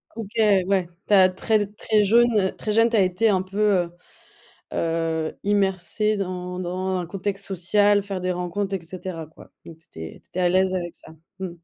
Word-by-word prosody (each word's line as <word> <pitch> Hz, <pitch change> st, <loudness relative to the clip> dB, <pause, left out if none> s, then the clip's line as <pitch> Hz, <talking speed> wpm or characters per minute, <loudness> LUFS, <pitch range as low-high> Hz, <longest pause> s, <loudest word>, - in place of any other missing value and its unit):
OK, 220 Hz, -3 st, -6 dB, 0.4 s
ouais. 190 Hz, -3 st, +1 dB, 0.2 s
Tu 210 Hz, -, +1 dB
as 185 Hz, -2 st, +7 dB
très 205 Hz, +3 st, +1 dB
très 210 Hz, +1 st, 0 dB
jaune 225 Hz, -2 st, +4 dB
très 215 Hz, -, -3 dB
jeune 225 Hz, +2 st, +4 dB
tu 230 Hz, -, -1 dB
as 210 Hz, -, +5 dB
été 185 Hz, +4 st, +2 dB
un 190 Hz, -3 st, +2 dB
peu, 190 Hz, +1 st, -9 dB, 0.3 s
heu 170 Hz, -, -9 dB, 0.8 s
heu, 165 Hz, -1 st, -1 dB
immergé 200 Hz, +1 st, +1 dB
dans 180 Hz, -2 st, -4 dB
dans 185 Hz, +1 st, -2 dB
un 175 Hz, -, -4 dB
contexte 195 Hz, +2 st, -3 dB
social, 205 Hz, +2 st, +2 dB
faire 195 Hz, -2 st, -4 dB
des 185 Hz, 0 st, -1 dB
rencontres 180 Hz, +3 st, -3 dB
et -, -, -7 dB
cetera, 175 Hz, -1 st, -7 dB
quoi. 155 Hz, -, -17 dB
Donc, 165 Hz, -1 st, -12 dB
tu 160 Hz, -, -29 dB
étais 80 Hz, 0 st, -9 dB
tu -, -, -24 dB
étais 185 Hz, -, -4 dB
à 180 Hz, -, +3 dB
l'aise 185 Hz, +1 st, +2 dB
avec 175 Hz, -2 st, -3 dB
ça. -, -, -15 dB, 0.3 s
Mmh. 190 Hz, -2 st, -3 dB
190 Hz, 195 wpm, -23 LUFS, 180-205 Hz, 0.8 s, as